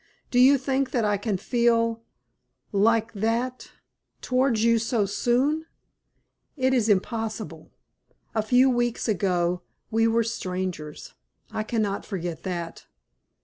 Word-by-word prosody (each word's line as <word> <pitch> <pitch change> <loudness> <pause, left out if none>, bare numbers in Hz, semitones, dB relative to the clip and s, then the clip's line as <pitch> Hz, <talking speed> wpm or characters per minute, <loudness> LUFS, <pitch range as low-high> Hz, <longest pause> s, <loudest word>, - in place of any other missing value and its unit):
Do 245 - +3
you 270 +3 +7
think 270 0 -1
that 240 -4 0
I 205 -1 +2
can 205 -1 -2
feel 230 +1 +1 0.7
like 225 +2 +2
that 230 +4 -2 0.5
towards 255 -3 +1
you 230 0 +4
so 225 -2 0
soon? 260 +10 +1 0.9
It 260 -1 +2
is 230 -4 +2
impossible. 220 +2 -2 0.6
A 220 - +1
few 250 +4 +4
weeks 240 -2 0
ago 180 -4 +1 0.3
we 225 +1 +3
were 230 +1 +2
strangers. 185 -8 -5 0.4
I 220 0 -2
cannot 215 -2 -1
forget 175 -5 -5
that." 175 -3 -5
225 Hz, 120 wpm, -25 LUFS, 200-245 Hz, 0.9 s, you